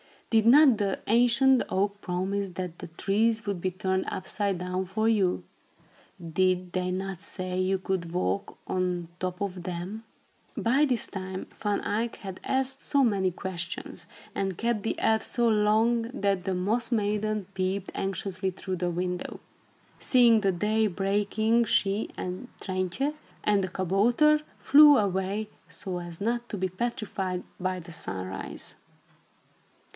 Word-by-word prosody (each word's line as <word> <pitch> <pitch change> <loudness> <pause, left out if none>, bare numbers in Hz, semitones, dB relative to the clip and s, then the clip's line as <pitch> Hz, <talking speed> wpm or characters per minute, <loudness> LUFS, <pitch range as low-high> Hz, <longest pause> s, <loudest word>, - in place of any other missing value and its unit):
Did 220 -1 +4
not 270 -1 +7
the 200 -2 0
ancient 245 +3 +5
oak 200 +1 0
promise 190 +2 -2
that 180 -1 -6
the - - -7
trees 220 +6 +1
would 200 -3 -2
be 185 - +1
turned 190 0 -1
upside 195 +1 -2
down 180 +1 -2
for 215 +4 0
you? 200 -5 +2 0.8
Did 180 +2 +1
they 185 0 -1
not 190 0 -3
say 185 -2 -4
you 190 +1 +2
could 185 -3 -3
walk 185 +2 -1
on 180 -2 -1
top 185 0 -3
of 185 -3 -3
them?" 185 +5 -5 0.5
By 265 +6 +3
this 250 -5 0
time, 190 -1 -6
Van 205 -2 -1
Eyck 225 +3 -1
had 190 -2 -8
asked 265 +1 0
so 280 -1 +2
many 200 -6 +2
questions, 175 -1 -6 0.3
and 195 -3 -2
kept 230 -3 0
the - - -1
elves 220 0 +2
so 240 -1 +2
long, 220 +2 +3
that 200 -6 0
the 190 - 0
Moss 220 +7 0
Maiden 210 -1 0
peeped 190 +1 -2
anxiously 190 0 -2
through 185 0 -5
the 175 0 -1
window. 180 +1 -3 0.6
Seeing 235 -4 +5
the 195 -2 +2
day 215 +4 +2
breaking, 205 +4 +1
she 200 0 +1
and 185 +7 -5
Trintje 185 +9 -1 0.3
and 205 -2 +3
the - - 0
kabouter 220 - +3 0.2
flew 295 0 +8
away, 200 +1 -1 0.2
so 175 +2 -4
as 175 0 -8
not 235 +3 -1
to 210 - -4
be 185 0 -1
petrified 190 -3 -3 0.2
by 185 0 -1
the 170 0 -11
sunrise. 95 - -5
195 Hz, 145 wpm, -28 LUFS, 185-220 Hz, 0.8 s, flew